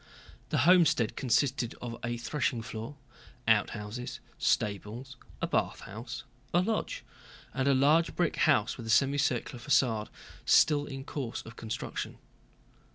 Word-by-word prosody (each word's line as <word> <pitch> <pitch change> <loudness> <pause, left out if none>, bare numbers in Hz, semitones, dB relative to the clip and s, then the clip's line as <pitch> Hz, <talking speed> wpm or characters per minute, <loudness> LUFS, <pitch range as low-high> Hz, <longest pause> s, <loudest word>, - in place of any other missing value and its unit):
The - - 0
homestead 170 -10 +5
consisted 125 -1 +1
of 120 -1 -5
a 120 0 -2
threshing 120 -2 -1
floor, 115 +5 -6 0.5
outhouses, 110 +2 0 0.2
stables, 110 +6 -1 0.3
a - - +4
bathhouse, 120 +6 -3 0.3
a - - +6
lodge, 220 +3 -2 0.5
and 135 +3 0
a 140 - +5
large 150 +6 +4
brick 175 -2 +1
house 125 -7 +3
with 115 -3 -3
semicircular 135 -2 +2
façade 110 -5 +2 0.4
still 145 -1 +4
in 135 -1 -6
course 135 -4 -4
of 115 +1 -11
construction. 110 -2 -5
125 Hz, 120 wpm, -30 LUFS, 115-145 Hz, 0.5 s, a